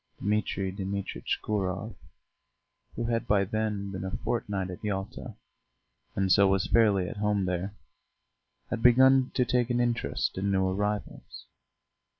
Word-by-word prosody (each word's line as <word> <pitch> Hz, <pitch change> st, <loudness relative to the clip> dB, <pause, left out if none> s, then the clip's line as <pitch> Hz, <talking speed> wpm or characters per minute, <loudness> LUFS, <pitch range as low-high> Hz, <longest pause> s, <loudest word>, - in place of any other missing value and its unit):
Dmitri 100 Hz, -2 st, -1 dB
Dmitritch 100 Hz, 0 st, -3 dB
Gurov, 100 Hz, +1 st, -2 dB, 1.0 s
who 120 Hz, -, -3 dB
had 115 Hz, -1 st, -1 dB
by 100 Hz, -1 st, +3 dB
then 105 Hz, -1 st, -2 dB
been 95 Hz, -1 st, -5 dB
a 95 Hz, -, -3 dB
fortnight 100 Hz, -3 st, -2 dB
at 90 Hz, -, -9 dB
Yalta, 95 Hz, -2 st, -4 dB, 0.8 s
and 95 Hz, -1 st, +1 dB
so 100 Hz, +1 st, +6 dB
was 95 Hz, -1 st, +2 dB
fairly 105 Hz, -5 st, +3 dB
at -, -, -7 dB
home 105 Hz, -2 st, +1 dB
there, 90 Hz, +3 st, -3 dB, 1.0 s
had 120 Hz, -, -2 dB
begun 130 Hz, +2 st, +6 dB
to 125 Hz, -, +3 dB
take 120 Hz, 0 st, +1 dB
an 120 Hz, 0 st, +1 dB
interest 115 Hz, -9 st, -1 dB
in 100 Hz, +1 st, 0 dB
new 95 Hz, -1 st, +2 dB
arrivals. 105 Hz, +2 st, -3 dB
100 Hz, 140 wpm, -28 LUFS, 95-115 Hz, 1.0 s, so